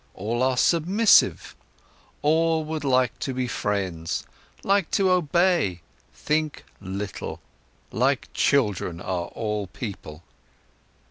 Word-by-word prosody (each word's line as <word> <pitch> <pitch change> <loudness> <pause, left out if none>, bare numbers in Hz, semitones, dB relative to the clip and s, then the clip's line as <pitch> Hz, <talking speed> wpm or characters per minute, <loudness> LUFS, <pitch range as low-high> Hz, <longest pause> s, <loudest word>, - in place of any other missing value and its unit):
All 115 +5 -2
are 130 0 +2
submissive, 185 - +3 0.7
all 160 +1 +2
would 155 0 -4
like 130 -3 +1
to 130 - -3
be 130 -1 -1
friends, 95 -8 -2 0.4
like 195 -3 +2
to 190 -2 +2
obey, 170 - +2 0.3
think 155 0 -2 0.2
little. 100 0 -5 0.5
Like - - +1
children 105 -10 +1
are 90 -1 -3
all 105 -3 -3
people." 90 - -8
130 Hz, 105 wpm, -25 LUFS, 100-160 Hz, 0.7 s, submissive